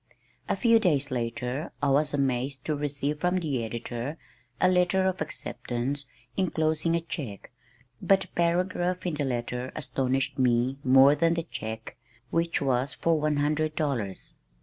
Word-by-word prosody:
A - - +2
few 230 -2 +5
days 145 - +1
later 125 +4 -2
I 145 - +1
was 145 +2 +3
amazed 135 -1 -1
to 155 - 0
receive 145 0 -2
from 180 +2 +1
the 145 -9 -1
editor 120 +5 -4 0.4
a 185 - +5
letter 185 +1 +3
of 185 -2 0
acceptance 140 -2 -3 0.3
enclosing 160 -2 +1
a 170 - 0
check, 135 -11 -6 0.5
but 195 -1 +4
a - - -21
paragraph 180 +1 0
in 175 - 0
the 145 -1 -1
letter 125 0 -3
astonished 135 -2 -1
me 125 +1 +2
more 135 +2 +7
than 165 +2 +2
the 170 - -1
check 110 -8 -6 0.3
which 165 -2 +1
was 130 0 +1
for 165 -2 +2
one 150 0 +1
hundred 155 +1 0
dollars. 120 - -2
145 Hz, 150 wpm, -27 LUFS, 130-165 Hz, 0.5 s, more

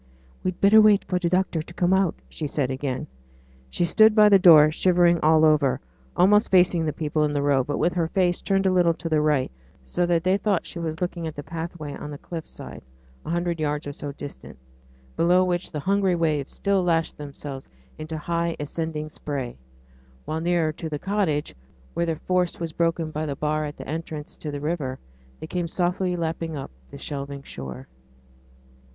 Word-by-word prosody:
'We'd 185 -1 -2
better 215 +2 +7
wait 210 -2 +5
for 180 -1 -1
t' 175 -2 0
doctors 180 -3 0
to 170 - -13
come 180 +1 +2
out,' 190 -3 +2
she 155 - -4
said 140 -2 -1
again. 130 -1 -3 0.6
She 175 - 0
stood 215 +5 +5
by 210 -1 +7
the 200 -1 +7
door, 155 -5 +8
shivering 175 0 +3
all 155 0 +5
over, 150 -4 +3 0.4
almost 210 +4 +5
facing 180 -3 +4
the - - +1
people 155 0 -1
in 150 -1 0
the 145 - 0
road, 135 -3 +2
but 145 - -1
with 175 - +1
her 170 -2 0
face 180 0 +1
turned 195 -1 +1
a 190 - +4
little 175 -2 +3
to 165 - -5
the 155 -1 +2
right, 150 - +1 0.3
so 175 - 0
that 170 -1 +1
they 185 +2 +3
thought 200 -3 0
she 175 - -6
was 160 0 -4
looking 175 -2 -2
at 155 - -6
the 145 - -6
pathway 160 -1 -6
on 150 - -7
the 145 - -7
cliff 165 +1 -7
side, - - -9 0.5
a - - -4
hundred 170 0 -1
yards 150 -1 -1
or 145 - -5
so 145 0 -6
distant, 145 - -9 0.6
below 180 +2 +4
which 180 -1 -2
the 150 - -3
hungry 195 +1 +2
waves 155 -5 0
still 195 -2 0
lashed 165 -2 +1
themselves 140 -2 -8 0.3
into 155 +1 -5
high 170 +2 -1
ascending 155 +1 -3
spray; 135 -6 -5 0.7
while 155 +2 -3
nearer 170 -2 +1
to 160 +1 -6
the 150 - -3
cottage, 185 -5 -1 0.4
where 170 0 -1
their 165 - 0
force 180 +2 -1
was 165 -1 -3
broken 165 -1 0
by 155 +1 -3
the 140 - -3
bar 155 +1 -1
at 145 - -7
the 130 - -9
entrance 155 0 -5
to 155 - -6
the 145 -1 -4
river, 150 -4 -2 0.4
they - - -6
came 175 +1 -2
softly 180 +1 0
lapping 165 -1 -3
up 135 - -7 0.2
the - - -10
shelving 140 -1 -6
shore. 65 - -8
165 Hz, 200 wpm, -24 LUFS, 150-180 Hz, 0.7 s, door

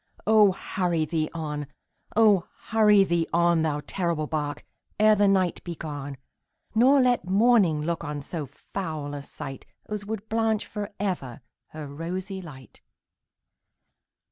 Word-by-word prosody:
Oh! 210 -2 +6
hurry 175 -4 -1
thee 155 -1 -1
on 150 -3 -4 0.5
oh! 210 -5 +5 0.2
hurry 210 -2 +6
thee 170 -3 0
on, 170 -1 +3
Thou 150 -2 0
terrible 170 -3 -1
bark, 150 -1 -3 0.3
ere 215 0 +6
the 205 -1 +3
night 190 -3 +1
be 175 -1 -5
gone, 145 -3 -6 0.6
Nor 260 +5 +5
let 250 -7 +2
morning 195 -7 +4
look 170 +1 -2
on 145 -2 -5
so 155 -1 -5
foul 155 -2 -6
a 145 - -5
sight 135 -1 -8 0.2
As 210 -1 -5
would 220 -1 -5
blanch 220 -1 0
for 210 0 -6
ever 160 - -3 0.3
her 155 -1 -8
rosy 180 +7 -5
light! 130 - -13
170 Hz, 140 wpm, -26 LUFS, 150-205 Hz, 0.6 s, Oh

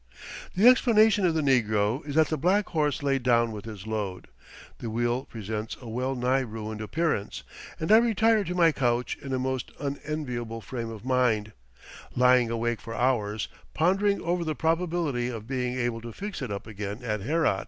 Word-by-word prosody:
The 200 +6 +5
explanation 220 -5 +5
of 165 - 0
the 160 - +1
negro 110 -2 +2
is 145 - -4
that 160 -1 +4
the 155 - 0
black 190 +6 +2
horse 150 -2 0
laid 135 -1 +1
down 120 -2 +3
with 105 -1 -7
his 105 -4 -8
load. 105 -4 -4 0.5
The 115 - -5
wheel 120 +3 -1
presents 110 0 -5
a 125 - -11
well 130 +4 -2
nigh 125 +2 +2
ruined 110 -3 -5
appearance, 150 -2 -2 0.4
and 160 - -1
I 220 - +9
retire 225 -1 +3
to 180 +1 -3
my 170 -2 +5
couch 125 -3 0
in 135 - -6
a 130 - +1
most 130 0 -2
unenviable 140 -5 -4
frame 115 0 -5
of 115 0 -9
mind; 120 -5 +1 0.6
lying 125 -1 +5
awake 115 0 -1
for 115 - -7
hours, 110 -4 0 0.3
pondering 195 +5 +2
over 175 +1 0
the 155 -2 -2
probability 160 -6 0
of 115 -4 -5
being 125 0 -2
able 120 -2 -1
to 120 0 -7
fix 200 - -6
it 125 -5 -4
up 100 - -5
again 105 +1 -6
at 105 -4 -2
Herat. 150 -4 +1
125 Hz, 185 wpm, -27 LUFS, 115-160 Hz, 0.6 s, I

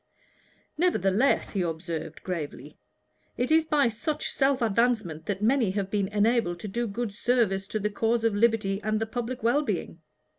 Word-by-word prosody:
"Nevertheless," 255 - +2
he 195 - -1
observed, 165 -2 -4
gravely, 150 -5 -5 0.6
"it 250 +4 -1
is 320 0 +5
by 295 -4 +3
such 285 +7 -2
self 270 -1 +2
advancement 220 -8 0
that 205 0 -2
many 240 -2 +3
have 195 0 -2
been 200 -2 +1
enabled 210 -3 +1
to - - -5
do 235 +4 -2
good 220 0 -3
service 210 -4 +1
to 215 - -2
the 210 0 -1
cause 225 +2 0
of 225 -2 +2
liberty 205 -2 +1
and 215 0 0
to 225 - 0
the 220 - -20
public 245 0 -4
well 240 +6 +3
being. 300 - -3
215 Hz, 175 wpm, -27 LUFS, 195-240 Hz, 0.6 s, is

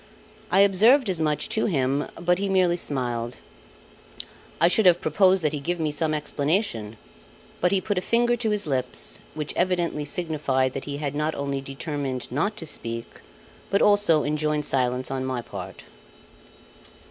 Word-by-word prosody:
I 195 - +5
observed 210 +5 +5
as 170 -3 -2
much 150 -1 0
to 220 - +1
him, 140 -5 0
but 175 +1 +1
he 200 0 -1
merely 185 -2 +3
smiled. 120 -7 -2 1.2
I 170 - +5
should 190 +3 +4
have 175 -1 +6
proposed 185 +3 +3
that 150 -1 +1
he 150 - -2
give 175 +5 -3
me 155 -2 0
some 155 +1 0
explanation; 150 - -1 0.6
but 180 - +2
he 195 - +3
put 200 0 -1
a - - -6
finger 240 +4 +2
to 235 -2 -1
his 210 -1 -1
lips, 130 -4 0 0.2
which 150 -1 -4
evidently 175 -4 0
signified 145 -5 -1
that 135 - -5
he 145 -1 -4
had 145 -2 -3
not 150 +2 -1
only 140 -1 -3
determined 135 -2 -5
not 180 - -1
to 165 - -6
speak, 115 -6 -6 0.5
but 200 - +2
also 205 -7 +4
enjoined 150 0 -1
silence 125 -2 0
on 130 -1 -2
my 130 -1 -2
part. 120 - -8
155 Hz, 165 wpm, -25 LUFS, 135-185 Hz, 1.2 s, have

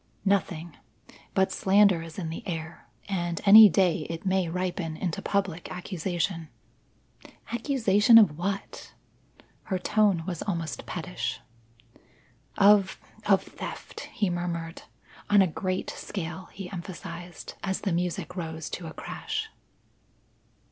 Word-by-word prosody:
"Nothing. 175 -4 0 0.6
But 190 -1 +3
slander 195 -3 +4
is 165 -1 -10
in 165 -4 -4
the 165 - -6
air, 165 -1 -6 0.2
and 175 -4 -2
any 210 +1 +11
day 175 -3 +2
it 165 +3 -6
may 190 -2 +1
ripen 180 -2 -3
into 175 -2 -3
public 190 -4 -2
accusation." 175 -2 -3 1.0
"Accusation 230 -3 +4
of 205 -10 +6
what?" 195 +4 -5 0.7
Her 190 - -1
tone 200 -2 +2
was 175 -3 -4
almost 165 -6 -4
pettish. - - -4 1.2
"Of 200 -1 +5 0.3
of - - +4
theft," - - -8
he 200 -4 0
murmured. 170 -1 -4 0.5
"On 205 -1 +6
a - - +3
great 185 +2 -3
scale," 180 -1 -6
he 195 -2 -7
emphasized, 175 -1 -8
as 190 -1 -1
the 200 - -1
music 180 +1 -2
rose 160 -3 -5
to 170 - -5
a 160 - -8
crash. 440 +1 -4
180 Hz, 120 wpm, -27 LUFS, 165-195 Hz, 1.2 s, any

